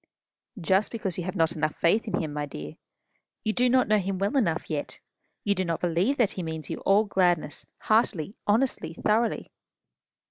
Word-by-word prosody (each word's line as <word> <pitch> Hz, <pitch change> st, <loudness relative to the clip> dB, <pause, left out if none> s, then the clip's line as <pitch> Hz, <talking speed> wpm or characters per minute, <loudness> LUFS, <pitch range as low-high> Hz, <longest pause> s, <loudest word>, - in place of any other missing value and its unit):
"Just 190 Hz, +4 st, +2 dB
because 195 Hz, -6 st, -3 dB
you 175 Hz, -, -3 dB
have 185 Hz, -, -4 dB
not 165 Hz, -3 st, +2 dB
enough 155 Hz, -2 st, 0 dB
of -, -, -29 dB
faith 210 Hz, +7 st, +2 dB
in 210 Hz, -, -1 dB
him, 155 Hz, -3 st, -3 dB
my 145 Hz, 0 st, -3 dB
dear. 75 Hz, -, -8 dB, 0.7 s
You 215 Hz, -, 0 dB
do 250 Hz, +2 st, +3 dB
not 255 Hz, 0 st, +3 dB
know 215 Hz, 0 st, +4 dB
him 195 Hz, 0 st, -2 dB
well 200 Hz, +8 st, -1 dB
enough 175 Hz, -11 st, +1 dB
yet. 150 Hz, -3 st, -3 dB, 0.4 s
You 205 Hz, -, +2 dB
do 190 Hz, -1 st, -1 dB
not 170 Hz, -2 st, -1 dB
yet 175 Hz, -2 st, +1 dB
believe 205 Hz, +12 st, +2 dB
that 235 Hz, -5 st, +3 dB
he 185 Hz, -, -4 dB
means 160 Hz, -3 st, -5 dB
you -, -, -3 dB
all 205 Hz, +3 st, +3 dB
gladness, 175 Hz, -6 st, 0 dB
heartily, 205 Hz, -6 st, +1 dB
honestly, 205 Hz, -7 st, +1 dB
thoroughly." 220 Hz, +4 st, 0 dB
190 Hz, 200 wpm, -27 LUFS, 165-215 Hz, 0.7 s, know